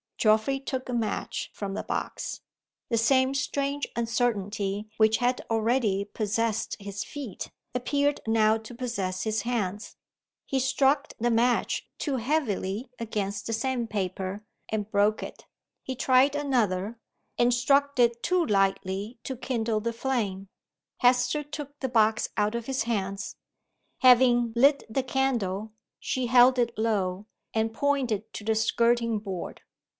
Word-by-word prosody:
Geoffrey 220 +5 +3
took 260 -1 -4
a - - -2
match 230 -3 -2
from 200 -1 -4
the - - -2
box. - - -4 0.5
The 230 - +1
same 260 +3 +3
strange 280 0 -1
uncertainty 210 -3 -1
which 220 0 +4
had 245 0 0
already 225 -3 +1
possessed 215 +1 -1
his 200 0 -5
feet, 275 -10 -7 0.2
appeared 285 +3 +1
now 220 0 +4
to 225 +2 -10
possess 205 -7 -3
his 220 -1 -1
hands. 210 -4 -2 0.5
He 270 - 0
struck 270 +3 +2
the 240 +1 +1
match 235 +1 +1
too 280 -4 -1
heavily 235 -4 -1
against 205 -3 -3
the 225 - -2
sandpaper, 210 -5 -2 0.3
and 210 -1 -2
broke 205 +1 +2
it. - - -9 0.4
He 260 - -4
tried 260 +2 +4
another, 230 -7 0 0.4
and 240 0 +4
struck 280 +3 +2
it 235 -1 +3
too 360 -1 +2
lightly 195 +2 0
to 265 - -4
kindle 230 -3 -1
the 230 +2 -2
flame. 215 -6 -2 0.5
Hester 250 +4 +3
took 290 0 -8
the 265 - -2
box 220 -2 +3
out 210 +1 +2
of 235 -1 -3
his 265 0 0
hands. 200 -3 -3 0.6
Having 245 -2 +5
lit 280 +4 +5
the 260 +4 0
candle, 225 -6 -1 0.3
she 255 -1 -2
hel 245 +1 +7
d 250 -2 +2
it 235 0 -6
low, 205 -3 0 0.3
and 225 0 0
pointed 240 -6 0
to - - -6
the 220 +1 +1
skirting 230 +1 +2
board. 195 -4 -6
230 Hz, 140 wpm, -27 LUFS, 210-260 Hz, 0.6 s, hel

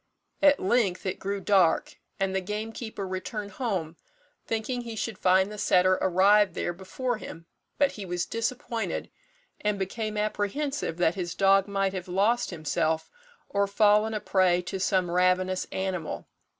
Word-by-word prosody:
At 290 -1 +6
length 195 -2 +1
it 190 - -2
grew 200 +1 -3
dark, 190 -4 +2 0.2
and 195 0 0
the 190 - +1
gamekeeper 215 +1 -5
returned 200 +3 -5
home, 190 -9 -3 0.5
thinking 230 +3 -2
he 230 -2 -7
should 220 -2 -4
find 190 +2 +3
the 210 - -7
setter 185 -2 +3
arrived 190 +1 +4
there 175 - -2
before 220 +7 -3
him; 165 -5 -9 0.3
but 285 -1 +3
he 210 - -7
was 175 -1 -1
disappointed, 230 0 -3 0.5
and 210 -1 0
became 210 +3 -3
apprehensive 215 - -2
that 175 -2 +3
his 175 -2 -4
dog 195 0 +4
might 195 -1 0
have 185 -1 -5
lost 210 +7 +1
himself, 160 -1 -1 0.4
or 200 0 +1
fallen 210 +2 +3
a - - -1
prey 185 -3 +2
to 190 +2 -4
some 185 -2 +1
ravenous 185 +1 +2
animal. 190 -4 -3
195 Hz, 150 wpm, -27 LUFS, 185-215 Hz, 0.5 s, At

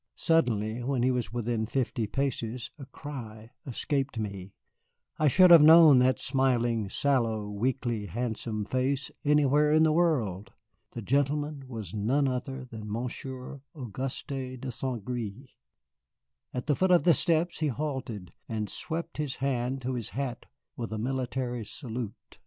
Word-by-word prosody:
Suddenly, 120 - +1
when 125 0 0
he 130 - +3
was 125 -2 -2
within 115 -2 -1
fifty 120 -2 -1
paces, 125 -2 -2
a 135 - -9
cry 115 -7 -9 0.2
escaped 135 +1 -2
me, 100 -3 -5 0.6
I 155 - +4
should 180 +5 +6
have 170 -3 +10
known 155 -3 +9
that 130 0 +3
smiling, 120 -5 +1
sallow, 115 -5 +1
weakly 115 0 -2
handsome 110 0 -3
face 130 +3 -1
anywhere 150 0 +4
in 155 +1 +5
the 160 - +4
world. 120 - +1 0.4
The 115 - -6
gentleman 145 +3 0
was 110 -8 -7
none 125 +7 +1
other 130 +1 -3
than 110 -4 -8
Monsieur 125 +3 -5
Auguste 130 +1 -5
de 130 0 -5
St. 120 -4 -4
Gré. 120 +1 -5 1.0
At 125 - -4
the 150 - +2
foot 190 +5 +2
of 180 -1 +5
the 175 - +6
steps 170 +1 +1
he 155 - +1
halted 130 - -4 0.2
and 110 -2 -3
swept 170 -1 -4
his 150 -3 -2
hand 130 -1 -1
to 130 +1 -2
his 120 -4 -3
hat 130 -3 -3 0.3
with 115 -2 -5
a 110 - -3
military 125 0 -2
salute. 115 -2 -7
125 Hz, 145 wpm, -29 LUFS, 115-140 Hz, 1.0 s, have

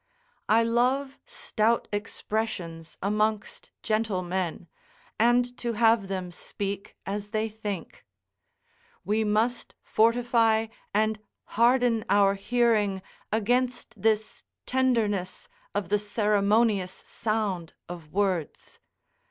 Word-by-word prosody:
I 225 +2 +5
love 255 +4 +1
stout 225 +1 0
expressions 205 -6 -4
amongst 210 +1 -1
gentle 215 -4 0
men, 175 -1 -3 0.5
and 245 +2 +3
to 235 -1 -2
have 225 -2 +3
them 185 -2 -4
speak 200 +3 -5
as 205 +1 -4
they 215 +1 0
think; 205 -5 -6 1.0
we 215 +2 +1
must 220 +3 0
fortify 230 -1 +3 0.3
and 215 +1 +1 0.3
harden 235 0 +3
our 200 -1 +5
hearing 210 -2 +1 0.3
against 240 +3 0
this 220 0 0 0.2
tenderness 225 -8 0 0.3
of 195 - -1
the 210 +1 +2
ceremonious 210 -1 +2
sound 210 -7 -2
of 170 -3 -9
words. 190 -5 -2
215 Hz, 95 wpm, -27 LUFS, 200-230 Hz, 1.0 s, I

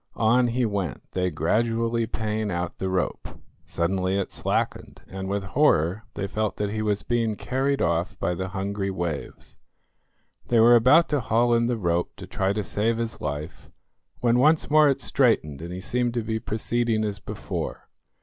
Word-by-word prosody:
On 120 +3 +3
he 120 +1 0
went, 100 - -3
they 90 0 0
gradually 115 +6 0
paying 110 -1 -2
out 90 -1 -3
the 95 - -1
rope. 95 -3 -3 0.3
Suddenly 95 +2 0
it 100 - -2
slackened, - - -2
and 95 0 -6
with 100 0 -1
horror 100 - +2
they 100 - -2
felt 110 +2 -2
that 105 -1 -1
he 110 0 -2
was 105 -1 0
being 115 -3 0
carried 135 +5 -1
off 85 +2 0
by 90 - -1
the 95 +2 -3
hungry 100 +1 -3
waves. 85 -6 -5 0.9
They 120 - +3
were 115 +2 +7
about 130 +8 +6
to 145 - +1
haul 120 0 +2
in 115 0 +3
the 120 -1 0
rope 85 -3 -1
to - - -9
try 95 0 -1
to 105 +1 -1
save 110 +4 0
his 115 -1 -4
life, 75 +2 -5 0.5
when 120 0 +3
once 155 +3 +3
more 155 -1 +6
it 140 0 0
straightened 95 - +1
and 85 +1 -6
he 90 +1 -6
seemed 120 +3 -1
to 120 - 0
be 110 0 -2
proceeding 115 0 -1
as 105 -1 -3
before. - - -5
110 Hz, 180 wpm, -25 LUFS, 95-120 Hz, 0.9 s, were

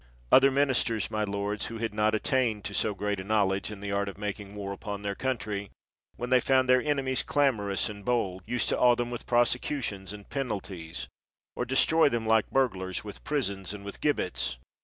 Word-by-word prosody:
Other 135 +1 +8
ministers, 130 -5 +1
my 110 0 0
lords, 100 0 -2
who 115 - -6
had 110 -1 -2
not 105 +1 +2
at 110 - -2
tained 120 -6 +1
to 100 - -5
so 105 +2 0
great 105 0 -2
a - - -4
knowledge 100 -2 +1
in 105 -2 -8
the 100 0 -4
art 100 0 0
of 100 - -10
ma 105 0 -1
king 100 0 -11
war 100 -1 -4
upon 100 0 -6
their 100 -1 -1
country, 105 -5 -3 0.5
when 125 +1 -5
they 130 - +7
found 130 +1 +3
their 125 0 +5
enemies 135 -3 +1
clamorous 110 -9 +1
and 105 -1 -8
bold, 100 -6 0
used 125 -2 0
to - - +1
awe 125 -1 +6
them 120 0 -2
with 120 - -6
prosecutions 120 -4 0
and 105 -1 -10
penalties, 100 - -4 0.5
or - - -1
de 130 - -3
stroy 160 +2 +5
them 115 -2 -1
like 110 -1 +3
burglars, 95 -9 0
with 105 -1 -9
prisons 100 -9 -2
and 100 -1 -10
with 100 - -8
gibbets. 65 - 0
105 Hz, 205 wpm, -28 LUFS, 100-125 Hz, 0.5 s, Other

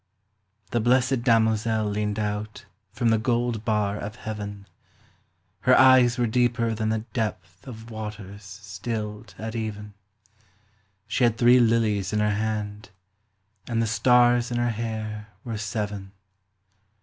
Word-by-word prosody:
* 100 0 -39
The 120 - +1
blessed 125 +2 +2
damozel 110 -2 +2
leaned 105 0 -2
out 105 0 -4 0.3
From 120 +3 0
the 110 -1 +3
gold 120 -1 0
bar 105 -2 0
of 105 +1 -6
Heaven; 105 -2 -6 0.9
Her - - +4
eyes 130 -2 +6
were 120 - +2
deeper 120 0 +1
than 110 0 -2
the 110 0 -1
depth 90 -4 -4
Of 115 -2 -9
waters 105 -2 -7
stilled 105 +1 -6
at 110 +2 -5
even, 105 -2 -5 1.1
She 130 - -1
had 115 -2 +3
three 125 +1 +6
lilies 110 -4 +2
in 105 - +1
her 105 0 +2
hand, 105 -1 -3 0.8
And 115 -2 -1
the 115 - +2
stars 120 +1 +4
in 120 - -2
her 120 0 +1
hair 110 -1 -5 0.2
were 115 -4 -5
seven. 105 -2 -4
110 Hz, 135 wpm, -25 LUFS, 105-120 Hz, 1.1 s, eyes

